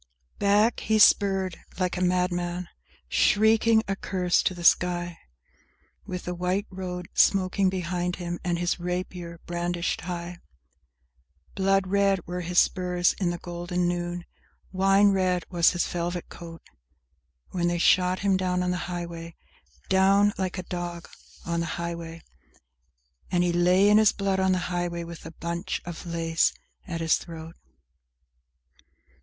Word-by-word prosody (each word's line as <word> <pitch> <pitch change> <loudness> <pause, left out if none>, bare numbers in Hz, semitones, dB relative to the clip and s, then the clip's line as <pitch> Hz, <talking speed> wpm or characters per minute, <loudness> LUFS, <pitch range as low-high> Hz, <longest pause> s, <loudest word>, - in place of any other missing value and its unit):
IX 60 0 -37
Back, 205 +3 +3
he 220 - +1
spurred 195 -4 +4 0.2
like 180 -1 -1
a 180 - -3
madman, 180 -1 0 0.4
shrieking 220 +1 +4
a 195 - -1
curse 180 -2 0
to 185 - -1
the 175 - -8
sky, 175 0 +2 0.9
With 180 -1 -5
the 180 - -4
white 180 +3 -1
road 180 -2 -5
smoking 190 0 +3
behind 180 -1 -2
him 175 -1 -5
and 175 -1 0
his 175 +1 -1
rapier 180 -1 -5
brandished 175 0 -2
high! 175 -1 -6 1.1
Blood 195 0 +2
red 195 -1 +1
were 180 +1 -4
his 175 +1 -4
spurs 180 -1 +3
i' - - +1
the 175 0 0
golden 175 +1 -3
noon; 175 0 -3 0.5
wine 195 +2 +4
red 185 -2 +1
was 170 -2 +4
his 175 - 0
velvet 175 0 -4
coat, 165 -1 -10 0.9
When 175 -1 0
they 175 0 0
shot 180 +1 +3
him 195 -1 +2
down 180 -1 0
on 180 - 0
the 180 - -1
highway, 170 -1 -6 0.5
Down 195 +2 +4
like 190 -1 -3
a 185 - -4
dog 175 -1 -5 0.4
on 170 0 -1
the 170 - -2
highway, 170 -1 -6 1.1
And 175 -1 +2
he 175 -1 +1
lay 180 +3 +4
in 210 +1 +6
his 215 -2 +5
blood 195 -1 -1
on 190 0 +2
the - - +1 0.2
highway, 175 -1 -2
with 170 -1 -9
the 165 - -9
bunch 170 +3 -4
of 175 0 -7
lace 165 -1 +1 0.3
at 170 -3 -4
his 160 -1 +3
throat. 165 -1 -9
180 Hz, 150 wpm, -26 LUFS, 175-190 Hz, 1.1 s, in